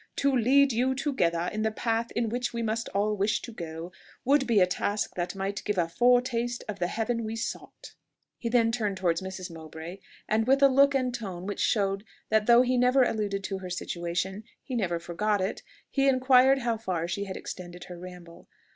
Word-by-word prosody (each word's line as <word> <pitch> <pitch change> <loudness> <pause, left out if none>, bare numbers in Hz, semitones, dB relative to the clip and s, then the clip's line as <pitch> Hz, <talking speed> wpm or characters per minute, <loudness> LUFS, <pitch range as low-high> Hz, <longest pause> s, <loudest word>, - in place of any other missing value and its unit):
"To 280 -1 +2
lead 265 +3 +4
you 255 +3 +1
together 180 - 0
in 215 - -2
the 220 - +2
path 230 +1 -1
in 235 -1 0
which 245 +2 -2
we 235 0 -2
must 225 +1 -2
all 210 +1 0
wish 205 +2 +1
to 240 - -7
go, 165 -3 -7 0.3
would 275 +1 +3
be 230 -4 +4
a 180 - +6
task 205 +3 -2
that 175 +2 -3
might 195 +1 -3
give 210 -2 -2
a 170 -2 +2
foretaste 245 +3 +2
of 205 -2 -5
the 175 - +1
heaven 230 +3 -2
we 220 +1 -4
sought!" 225 - -6 0.5
He 235 - -2
then 230 -1 +3
turned 210 -4 -1
towards 170 -2 0
Mrs. 190 -1 -6
Mowbray, 160 +3 -9 0.3
and 220 +2 +1
with 275 +1 +4
a 275 - +8
look 275 +1 +4
and 255 -2 0
tone 190 -7 -5
which 205 0 -4
showed 200 -2 +1 0.3
that 215 -1 +2
though 240 +1 +7
he 255 0 +1
never 250 +2 +5
alluded 205 -4 -1
to 195 0 -3
her 185 -1 -7
situation, 180 +3 -3 0.2
he 260 - -7
never 190 -8 0
forgot 200 +5 -1
it, 190 +2 -2 0.3
he 275 -1 +3
inquired 260 0 +5
how 235 -2 0
far 180 -6 -2
she 200 +4 -3
had 190 -1 -6
extended 175 -1 -8
her 180 -1 -9
ramble. 180 -2 -11
215 Hz, 205 wpm, -28 LUFS, 185-245 Hz, 0.5 s, a